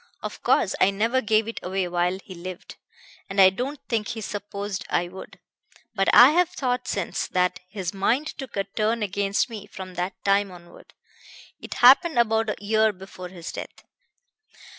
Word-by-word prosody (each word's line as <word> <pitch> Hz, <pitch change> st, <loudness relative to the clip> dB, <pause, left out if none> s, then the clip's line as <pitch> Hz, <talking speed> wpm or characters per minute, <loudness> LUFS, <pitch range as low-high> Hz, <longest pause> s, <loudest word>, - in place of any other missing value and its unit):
Of -, -, -6 dB
course -, -, +2 dB
I 185 Hz, -, +6 dB
never 225 Hz, +6 st, +1 dB
gave 220 Hz, 0 st, +2 dB
it 230 Hz, -, -5 dB
away 185 Hz, 0 st, -2 dB
while 175 Hz, +1 st, 0 dB
he 185 Hz, -, -10 dB
lived, 180 Hz, +1 st, -9 dB, 0.5 s
and 195 Hz, +1 st, -2 dB
I 190 Hz, -1 st, +8 dB
don't 260 Hz, +8 st, -4 dB
think 220 Hz, -3 st, -1 dB
he 225 Hz, -, -5 dB
supposed 200 Hz, -1 st, -5 dB
I 175 Hz, 0 st, 0 dB
would; 185 Hz, +2 st, -11 dB, 0.5 s
but 195 Hz, -2 st, +1 dB
I 250 Hz, +4 st, +9 dB
have 350 Hz, +2 st, +3 dB
thought 250 Hz, -6 st, -2 dB
since 195 Hz, -4 st, -2 dB
that 180 Hz, 0 st, 0 dB
his 190 Hz, -3 st, -4 dB
mind 230 Hz, +9 st, +1 dB
took 265 Hz, -6 st, -7 dB
a 195 Hz, -, +1 dB
turn 215 Hz, +3 st, -1 dB
against 200 Hz, +2 st, 0 dB
me 220 Hz, -4 st, -9 dB
from 185 Hz, -1 st, -9 dB
that 180 Hz, +2 st, -3 dB
time 200 Hz, 0 st, +3 dB
onward. 175 Hz, -1 st, -15 dB, 0.6 s
It -, -, -8 dB
happened 290 Hz, +4 st, +7 dB
about 225 Hz, -1 st, +2 dB
a -, -, -1 dB
year 220 Hz, +1 st, +3 dB
before 185 Hz, -1 st, -10 dB
his 175 Hz, -2 st, -8 dB
death." -, -, -9 dB
200 Hz, 175 wpm, -24 LUFS, 185-225 Hz, 0.6 s, I